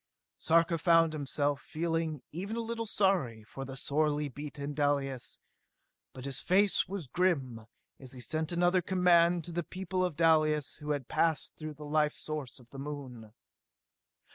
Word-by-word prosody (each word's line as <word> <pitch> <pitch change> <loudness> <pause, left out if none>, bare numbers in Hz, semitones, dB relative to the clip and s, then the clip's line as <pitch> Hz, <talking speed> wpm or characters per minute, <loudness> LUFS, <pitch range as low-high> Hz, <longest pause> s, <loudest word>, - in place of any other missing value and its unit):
Sarka 165 0 +3
found 165 -1 +4
himself 145 -1 0
feeling 165 -2 -2
even 195 +7 -4
a - - -2
little 230 0 -3
sorry 180 - +1
for 135 +5 -8
sorely 150 +1 0
beaten 145 +1 -6
Dalis; 140 -3 0 0.7
but 130 0 -9
his 140 -2 -3
face 195 +2 +3
was 190 -4 -4
grim 130 -8 0 0.3
as 130 -2 -9
he 130 - -7
sent 155 +5 -2
another 175 +1 +3
command 175 -2 +4
to 175 - -7
the 175 +1 -1
people 185 +1 -3
of 180 -4 -1
Dalis 155 -2 +3
who 150 -1 -8
had 145 -4 -1
passed 160 -4 +1
through 155 -1 -7
the 150 +1 -9
life 150 0 +1
source 150 -5 -5
of 120 - -18
the 135 - -9
Moon. 135 -6 -7
155 Hz, 155 wpm, -31 LUFS, 140-175 Hz, 0.7 s, found